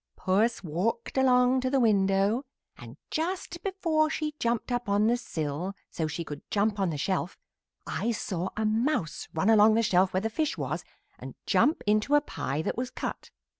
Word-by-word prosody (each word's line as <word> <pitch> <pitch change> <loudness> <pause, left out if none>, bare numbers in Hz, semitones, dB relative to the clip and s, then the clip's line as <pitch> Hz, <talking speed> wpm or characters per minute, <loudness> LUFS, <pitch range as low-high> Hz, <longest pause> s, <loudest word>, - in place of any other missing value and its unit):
"Puss 205 +4 +1
walked 185 +8 -2
along 255 -1 +4
to 255 - 0
the 270 0 +2
window, 200 +1 +2 0.3
and - - -12
just 345 +1 -3
before 335 -6 +1
she 305 -1 -2
jumped 235 +1 -1
up 245 -3 -2
on 205 +1 +3
the 235 +2 +3
sill 165 -2 -4 0.2
so 160 - -2
she 165 +3 -4
could 145 -2 -7
jump 205 0 +1
on 190 -2 +1
the 155 - -3
shelf 185 +4 -2 0.5
I 235 - -2
saw 190 -5 -2
a 220 - 0
mouse 220 - 0
run 190 +7 +3
along 215 0 +6
the 230 - +3
shelf 185 -2 +3
where 185 - 0
the 225 +1 -2
fish 310 +5 -1
was - - -3 0.4
and - - -9
jump 310 - +2
into 215 +7 +3
a - - +7
pie 155 - -3
that - - -2
was 250 0 -2
cut. - - -5
220 Hz, 185 wpm, -28 LUFS, 190-255 Hz, 0.5 s, a